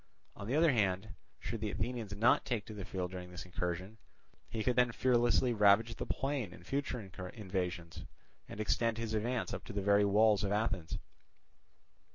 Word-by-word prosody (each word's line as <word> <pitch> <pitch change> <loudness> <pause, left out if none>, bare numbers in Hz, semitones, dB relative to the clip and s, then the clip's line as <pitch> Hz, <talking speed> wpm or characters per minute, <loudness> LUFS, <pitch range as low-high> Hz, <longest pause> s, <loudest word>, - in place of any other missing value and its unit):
On 100 - -7
the 125 - 0
other 160 0 +5
hand, 100 -3 +1 0.3
should 115 - -5
the 110 - -1
Athenians 110 -1 -3
not 115 +4 +4
take 110 -4 -2
the 105 -3 -7
field 90 -1 -4
during 90 -1 -7
this 90 0 -8
incursion, 90 +4 -4 0.5
he 110 -1 -3
could 125 +1 +1
then 125 -1 +4
fearlessly 120 0 +3
ravage 105 +2 +5
the - - -5
plain 135 -8 -1
in 85 - -13
future 140 +4 -2
invasions, 90 -3 -5 0.5
and 100 - -8
extend 115 +1 +1
his 115 -1 -3
advance 115 +3 -1
up - - -5
to 115 - -7
the 100 - -1
very 100 +1 +5
walls 105 0 +4
of 100 - 0
Athens. 100 -6 -1
105 Hz, 175 wpm, -34 LUFS, 95-115 Hz, 0.5 s, other